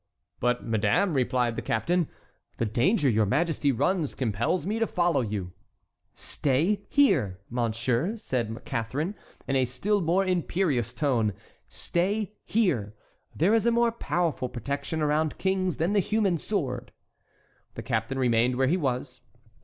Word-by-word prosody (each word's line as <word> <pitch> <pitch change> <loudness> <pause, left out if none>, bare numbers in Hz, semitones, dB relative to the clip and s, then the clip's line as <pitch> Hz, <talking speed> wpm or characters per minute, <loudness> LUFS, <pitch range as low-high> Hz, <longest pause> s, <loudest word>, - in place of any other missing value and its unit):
"But, 125 0 0
madame," 110 - +1
replied 125 -3 +1
the - - -3
captain, 170 +8 0 0.5
"the 115 - 0
danger 140 - +2
your 110 -4 +3
majesty 150 - +1
runs 160 +4 0
compels 120 - 0
me 215 +4 -1
to 225 - +2
follow 175 -6 +1
you." 100 -6 -4 0.6
"Stay 155 +9 0
here, 130 - +3
monsieur," 120 - 0
said 120 - -3
Catharine, 135 - -2 0.3
in 135 - 0
a 130 -1 +3
still 195 - 0
more 180 +4 +2
imperious 170 - 0
tone, 120 -8 +1 0.3
"stay 200 +4 -1
here. 135 - 0 0.4
There 180 +8 +3
is 225 0 +3
a - - +5
more 235 0 +3
powerful 170 - -1
protection 140 +6 -3
around 150 +1 +1
kings 190 -1 0
than 170 +5 0
the 205 - +4
human 200 -3 +1
sword." 135 - -3 0.8
The - - -6
captain 115 +2 -1
remained 125 -1 +2
where 130 +1 +2
he 170 +7 +2
was. 125 -4 -3
140 Hz, 140 wpm, -27 LUFS, 120-185 Hz, 0.8 s, a